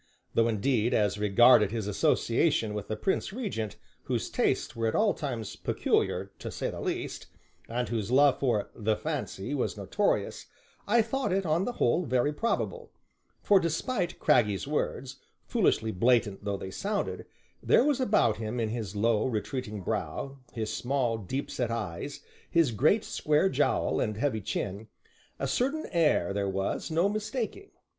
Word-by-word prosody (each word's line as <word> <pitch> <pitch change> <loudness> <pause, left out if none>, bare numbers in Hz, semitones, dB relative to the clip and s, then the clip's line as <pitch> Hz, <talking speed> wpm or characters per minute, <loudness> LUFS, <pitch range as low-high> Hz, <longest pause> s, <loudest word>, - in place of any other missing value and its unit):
Though, 115 0 +3
indeed, 115 +1 +1
as 105 -1 +1
regarded 105 +1 +6
his 110 -1 -3
association 115 +4 +1
with 105 -1 -5
the 110 - -2
Prince 190 - -1
Regent, 180 - -4 0.3
whose - - -2
tastes - - 0
were 115 0 0
at 110 - -1
all 215 -1 +3
times 120 - -4
peculiar - - 0
(to - - -5
say - - -3
the - - -7
least), - - -4 0.4
and 120 +1 -1
whose 110 -3 -2
love 140 +2 +5
for 120 -7 0
"the 110 -1 0
fancy" 100 +6 -4
was 135 - -1
notorious, - - -1 0.4
I 230 +2 +4
thought 265 +2 -2
it, 195 +1 +1
on 165 +4 +1
the 245 - -2
whole, 165 - +1
very 130 +4 +1
probable; 455 - -2 0.5
for 200 -2 +5
despite 175 +4 -1
Craggy's 105 -2 +2
words, 135 -3 -2 0.3
foolishly 110 0 +1
blatant 110 -1 +2
though 100 -1 -1
they 95 0 -7
sounded, 200 - -3 0.3
there - - +4
was 285 -2 +2
about 205 - +3
him 110 +2 -3
in 110 -2 0
his 110 -3 -4
low, 110 +2 +2
retreating 110 -2 -3
brow, 135 +8 -3
his 110 -3 -3
small, 120 -3 0
deep 120 +8 -4
set 125 -3 -1
eyes, 115 +3 -4 0.3
his 165 -6 +3
great 155 - +3
square 155 +5 +1
jowl - - +1
and 105 -1 -1
heavy 125 -3 0
chin, 100 +2 -4 0.5
a - - -2
certain 280 +6 0
air 150 - +2
there 100 -1 -1
was 95 - -2
no 165 +4 +2
mistaking. 220 - -3
120 Hz, 160 wpm, -29 LUFS, 110-170 Hz, 0.5 s, regarded